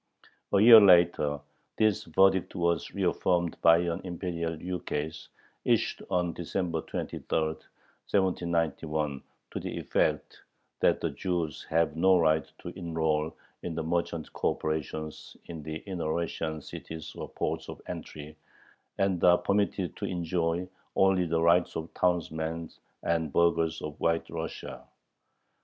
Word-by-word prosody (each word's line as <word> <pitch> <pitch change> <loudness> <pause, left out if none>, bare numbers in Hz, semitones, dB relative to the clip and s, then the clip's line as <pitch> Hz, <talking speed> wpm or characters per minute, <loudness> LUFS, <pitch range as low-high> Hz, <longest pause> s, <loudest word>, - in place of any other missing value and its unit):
A 100 - +4
year 110 +1 +10
later 85 -6 +5 0.4
this 110 -1 +2
verdict 95 +2 +3
was 85 -1 0
reaffirmed 85 -2 +1
by 85 0 +7
an 85 -1 -1
Imperial 85 -2 -3
ukase 80 -3 -4 0.4
issued - - +1
on 90 -2 0
December 85 -1 -2
23, - - -5
1791, 80 -2 -1 0.3
to - - -4
the - - -5
effect - - -1 0.4
that - - +3
"the - - -1
Jews 85 0 -2
have 80 -1 +2
no 95 +3 +5
right 80 -3 +2
to - - -5
enroll 80 -2 -1 0.3
in 85 -2 -4
the 80 - -2
merchant 85 -1 -2
corporations 80 0 -3
in 80 -2 -7
the 80 +1 -5
inner 90 -5 -3
Russian 80 -2 -3
cities 80 -1 -8
or - - -7
ports - - -3
of - - -7
entry, 75 0 -8 0.6
and 95 -3 +1
are 90 0 +7
permitted 100 -1 0
to - - -3
enjoy 85 0 -1 0.3
only 95 -2 +3
the 80 0 +1
rights 85 +1 +3
of 80 +1 -5
townsmen 80 -2 -1 0.3
and 80 -3 0
burghers 85 -1 +2
of 75 -1 -6
White 85 0 0
Russia." 80 -1 -6
85 Hz, 130 wpm, -29 LUFS, 80-90 Hz, 0.6 s, year